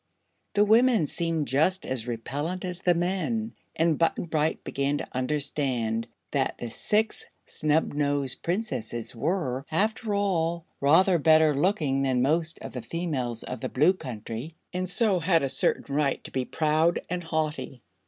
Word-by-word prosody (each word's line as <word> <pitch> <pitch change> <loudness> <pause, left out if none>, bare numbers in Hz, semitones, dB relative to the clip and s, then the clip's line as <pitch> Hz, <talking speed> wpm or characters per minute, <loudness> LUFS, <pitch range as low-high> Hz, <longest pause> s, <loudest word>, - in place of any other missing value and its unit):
The 205 0 +5
women 225 -3 +4
seemed 165 -1 -1
just 160 +8 +2
as 125 -3 -2
repellent 145 - -3
as 180 -1 -4
the 175 -1 +2
men, 195 +6 -1 0.2
and 165 -2 +2
Button 165 +1 +1
Bright 155 -1 -1
began 140 +1 -1
to - - -5
understand 130 -4 -1 0.2
that - - 0
the 120 - -6
Six 215 - 0 0.2
Snubnosed 145 -3 0
Princesses 130 - -3
were, 135 -1 -1
after 215 +4 0
all, 170 -4 0
rather 170 +5 +5
better 155 -1 +5
looking 145 -4 +1
than 130 -2 +2
most 160 +3 +1
of - - -6
the 125 - -5
females 130 -4 -3
of - - -6
the - - -3
Blue 155 +8 +4
Country 120 - -7 0.2
and 180 0 -2
so 200 -2 +3
had 165 -2 +2
a 135 - 0
certain 140 - +1
right 145 -1 0
to - - -6
be 130 -1 -1
proud 155 +3 +2
and 180 0 -3
haughty. 155 -5 -3
155 Hz, 155 wpm, -27 LUFS, 135-180 Hz, 0.2 s, The